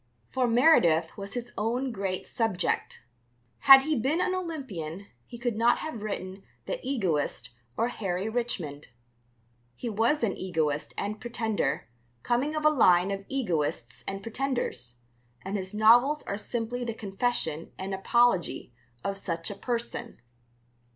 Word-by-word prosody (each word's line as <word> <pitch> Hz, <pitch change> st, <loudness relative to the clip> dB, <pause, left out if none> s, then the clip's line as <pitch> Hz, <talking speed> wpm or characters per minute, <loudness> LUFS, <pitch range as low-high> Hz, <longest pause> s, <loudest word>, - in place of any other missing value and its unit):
For 255 Hz, -2 st, +1 dB
Meredith 205 Hz, -, +4 dB
was 200 Hz, +2 st, -7 dB
his 245 Hz, 0 st, -4 dB
own 245 Hz, +5 st, 0 dB
great 195 Hz, -4 st, -3 dB
subject. 220 Hz, -, -1 dB, 0.6 s
Had 270 Hz, -1 st, +10 dB
he 310 Hz, +2 st, +1 dB
been 270 Hz, +7 st, +1 dB
an 370 Hz, 0 st, +1 dB
Olympian 220 Hz, -, -5 dB, 0.2 s
he 240 Hz, -, -9 dB
could 240 Hz, -1 st, -1 dB
not 230 Hz, +2 st, +4 dB
have 310 Hz, -9 st, -5 dB
written 195 Hz, -2 st, -5 dB, 0.2 s
The -, -, -3 dB
Egoist 165 Hz, -, -1 dB, 0.3 s
or 235 Hz, -, +2 dB
Harry 195 Hz, -4 st, -2 dB
Richmond. 205 Hz, -11 st, -3 dB, 0.9 s
He 235 Hz, -, -4 dB
was 230 Hz, +7 st, +1 dB
an 210 Hz, -, +1 dB
egoist 160 Hz, -5 st, -2 dB
and 210 Hz, +2 st, -3 dB
pretender, 225 Hz, -, -1 dB, 0.4 s
coming 265 Hz, +6 st, 0 dB
of 305 Hz, 0 st, -2 dB
a 305 Hz, -, +7 dB
line 185 Hz, -9 st, +5 dB
of 195 Hz, 0 st, -4 dB
egoists 150 Hz, -, -2 dB
and 195 Hz, 0 st, -4 dB
pretenders, 230 Hz, -, -3 dB, 0.4 s
and 195 Hz, +2 st, -3 dB
his 190 Hz, -2 st, -3 dB
novels 240 Hz, +8 st, +5 dB
are -, -, -3 dB
simply 240 Hz, +3 st, -3 dB
the 230 Hz, -2 st, -3 dB
confession 195 Hz, -7 st, -1 dB
and 190 Hz, +1 st, -4 dB
apology 195 Hz, -, +2 dB, 0.3 s
of 195 Hz, 0 st, -2 dB
such 170 Hz, -1 st, -2 dB
a -, -, -6 dB
person. 235 Hz, +3 st, -4 dB
215 Hz, 140 wpm, -28 LUFS, 185-245 Hz, 0.9 s, Had